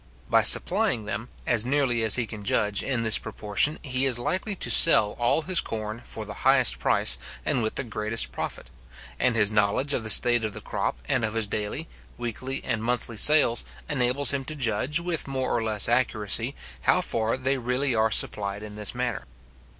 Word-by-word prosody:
By - - +4
supplying 115 -3 +4
them, 115 +3 -6 0.2
as 120 -3 +2
nearly 130 -2 -1
as 110 -2 +4
he 125 - -1
can 105 -2 -11
judge, 105 0 -1
in 125 -4 -3
this 110 -1 +2
proportion, 110 +6 -1
he 130 -2 -2
is 125 -3 +2
likely 185 - -4
to - - -4
sell 105 -10 +6
all 120 +7 0
his 185 0 +1
corn 110 0 -7
for 120 - -9
the - - -8
highest - - +3
price, - - +2 0.3
and 125 - -1
with 110 -1 -4
the - - -2
greatest 110 -1 -1
profit; - - -7 0.5
and 125 -2 +1
his 105 -2 +1
knowledge 105 +7 0
of 120 - -3
the 110 - -3
state 120 +2 +7
of 110 -2 -4
the - - -7
crop, - - -4
and - - -1
of 110 0 -2
his 115 -1 0
daily, 105 0 -5 0.3
weekly, 130 +3 -6
and 110 0 -4
monthly 120 -1 -3
sales, 135 0 +5 0.2
enables 130 0 +2
him 135 -1 -3
to 155 - -6
judge, 130 +4 -1
with 170 -3 -3
more 130 -1 -3
or 120 - -1
less 110 -2 +1
accuracy, 115 0 0 0.3
how - - +2
far 115 +2 -3
they 130 +1 -2
really 125 +2 -2
are 110 0 0
supplied 100 -1 +1
in 105 -1 -10
this 105 -1 -2
manner. - - -4
115 Hz, 195 wpm, -24 LUFS, 110-130 Hz, 0.5 s, state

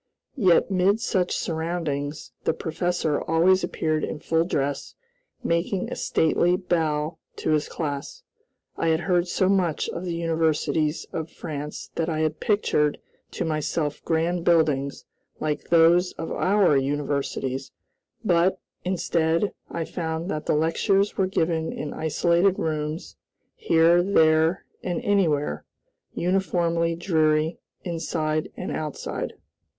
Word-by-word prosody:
Yet 190 -4 +4
mid 190 +3 +3
such 185 -6 0
surroundings, 160 -3 -3
the - - +1
professor 165 -2 -1
always 175 +4 +3
appeared 155 -1 -1
in - - -3
full 165 +2 +1
dress, 145 -5 -2 0.5
making 170 +3 0
a - - -2
stately 175 +2 +2
bow 160 -4 -1 0.2
to - - -1
his 150 -1 +1
class. 150 - -4 0.5
I 165 - 0
had 160 0 +2
heard 180 -1 +1
so 185 +1 +1
much 185 -5 +1
of 170 - -5
the 175 -2 -3
universities 160 -2 0
of 160 0 -3
France 150 -2 -6
that 165 0 -1
I 155 -1 -1
had 155 0 -1
pictured 150 -8 +1 0.3
to 175 - -2
myself 155 -1 -2
grand 165 +1 0
buildings, 150 -5 +2 0.3
like 150 -1 -3
those 170 +2 +5
of 165 - -6
our 190 -5 +3
universities; 135 -1 -1 0.5
but, 180 0 +3 0.2
instead, 170 0 0 0.2
I 165 -1 -3
found 165 +2 -3
that 155 0 -4
the - - +3
lectures 195 +6 +2
were 190 - +1
given 165 -3 0
in 150 - -5
isolated 170 +4 +2
rooms, 155 +1 -3 0.4
here, 170 - +4
there, 160 -2 +3 0.2
and 175 -2 -2
anywhere 155 - +1 0.5
uniformly 170 -2 +1
dreary 160 -2 +1 0.2
inside 155 -2 -2
and - - -4
outside. 155 -2 -4
165 Hz, 125 wpm, -25 LUFS, 155-175 Hz, 0.5 s, those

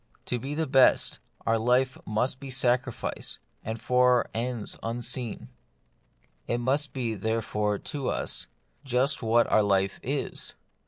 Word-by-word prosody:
To 125 - -1
be 140 +4 -4
the 160 +1 0
best, 135 -2 +4 0.3
our 115 0 +3
life 125 +3 +3
must 125 +5 0
be 140 - -7
sacrifice, 125 -1 0 0.3
and 110 +1 -4
for 125 0 +4
ends 120 -1 -3
unseen. 120 0 -4 1.0
It 120 - +1
must 135 +5 0
be, 120 -4 -2
therefore, 105 -1 -1
to 140 +2 -3
us, - - -2 0.4
just 135 +2 +1
what 115 0 +4
our 110 - +6
life 95 -1 +2
is. - - -3
125 Hz, 130 wpm, -28 LUFS, 110-130 Hz, 1.0 s, our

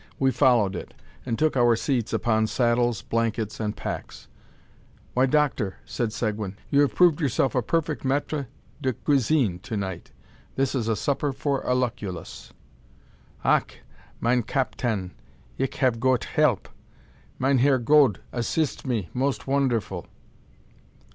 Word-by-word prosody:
We 135 -1 +2
followed 120 -9 +3
it, - - -7 0.3
and 115 - -1
took 155 -1 +2
our 120 -2 +4
seats 120 -1 -1
upon 110 -2 +1
saddles, 120 -3 +1
blankets, 115 -2 -1
and 105 -2 -2
packs. - - -6 0.9
"Why, 130 +2 +3
doctor," 135 -8 +1
said 115 -3 -2
Seguin, 105 -3 -3
"you 140 - +5
have 145 - +1
proved 175 -3 +4
yourself 135 -1 +1
a 125 - +2
perfect 155 +4 -1
maitre 140 +1 -1 0.3
de 130 -2 0
cuisine 130 - +1
to 110 +3 -5
night. 95 -4 -5 0.4
This 135 -1 0
is 120 -5 -1
a 110 - +1
supper 140 +4 -1
for 135 +1 -1
a 125 - 0
Lucullus." 110 -9 -4 0.9
"Ach! - - +2 0.4
mein 125 +1 +2
captain, 115 -5 -2 0.5
ich 135 0 -1
have 125 -4 +2
goet 130 0 +2
help; 150 - +1 0.7
Meinherr 135 0 +3
Gode 130 -3 +4
assist 135 +5 -1
me 115 -8 -1
most 135 +2 -1
wonderful." 120 - 0
125 Hz, 135 wpm, -25 LUFS, 110-140 Hz, 0.9 s, you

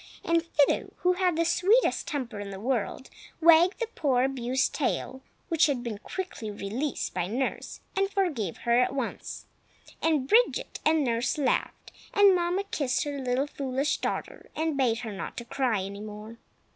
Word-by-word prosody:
And 335 0 +3
Fido, 305 -4 +1
who 360 0 +4
had 365 -2 +1
the 335 +1 +1
sweetest 380 +8 +3
temper 255 -9 -4
in 205 -1 -5
the 195 -1 -7
world, 245 +2 -2 0.3
wagged 335 +3 +6
the 470 - 0
poor 280 - +1
abused 265 0 0
tail 265 -2 -2 0.3
(which 330 -1 +4
had 265 -4 -1
been 220 -4 -4
quickly 365 - -5
released 215 +8 -3
by 180 -1 -1
nurse), 250 +6 -3
and 390 0 +1
forgave 310 - -1
her 235 +1 +4
at 250 +2 +1
once. 270 - -4 0.6
And 305 -5 +1
Bridget 470 - +2
and 310 -1 +3
nurse 235 +1 0
laughed; 285 - -1 0.2
and 405 -2 +7
Mamma 355 +2 0
kissed 285 -10 -1
her 290 -2 -4
little 255 +1 0
foolish 275 -1 -1
daughter, - - -4
and 315 -1 -1
bade 245 -4 +1
her 225 -3 -5
not 195 - -6
cry 255 -8 +1
any 200 +1 -7
more. 215 +2 -9
270 Hz, 165 wpm, -28 LUFS, 235-335 Hz, 0.6 s, and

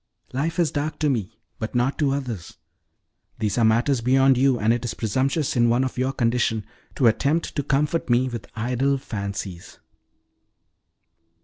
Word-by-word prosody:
Life 155 +6 -1
is 170 -3 +2
dark 150 +1 -2
to 150 -2 +1
me, 110 -3 -3 0.2
but 110 +2 -4
not 125 +3 +1
to 145 -3 +2
others: 125 -10 -4 0.8
these 110 0 -1
are - - +3
matters 115 +4 +3
beyond 135 +2 +4
you, 130 0 +3
and 110 +2 +3
it 120 0 -2
is 115 -2 -3
presumptuous 130 +7 0
in 120 -1 +4
one 120 +3 +3
of 130 - -3
your 130 +1 0
condition 115 -4 0 0.3
to 130 - +1
attempt 140 +8 +2
to 145 - +1
comfort 145 +2 0
me 120 +2 +3
with 115 -5 -6
idle 125 +5 0
fancies." 100 -7 -6
125 Hz, 165 wpm, -24 LUFS, 115-140 Hz, 0.8 s, beyond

